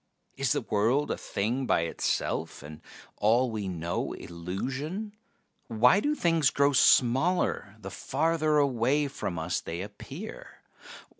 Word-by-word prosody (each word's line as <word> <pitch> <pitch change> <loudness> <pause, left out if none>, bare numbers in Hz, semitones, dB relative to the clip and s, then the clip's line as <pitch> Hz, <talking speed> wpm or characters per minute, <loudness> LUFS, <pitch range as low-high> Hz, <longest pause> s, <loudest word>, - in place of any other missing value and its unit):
Is - - +1
the - - -1
world 115 +8 +1
a - - 0
thing 120 +6 -2
by - - +3
itself, 80 -3 -2
and 75 +1 -10 0.4
all 115 +4 +3
we 105 -3 -3
know 85 -2 -3
illusion? 135 - -5 0.5
Why 125 - +4
do 295 +7 0
things 165 - +2
grow 140 0 +2
smaller 130 - +3
the 100 -2 -8
farther 155 - 0
away 140 +1 +2
from 95 -9 -5
us 80 +2 -2
they 85 +2 -5
appear? 145 - -10
125 Hz, 130 wpm, -28 LUFS, 100-150 Hz, 0.5 s, Why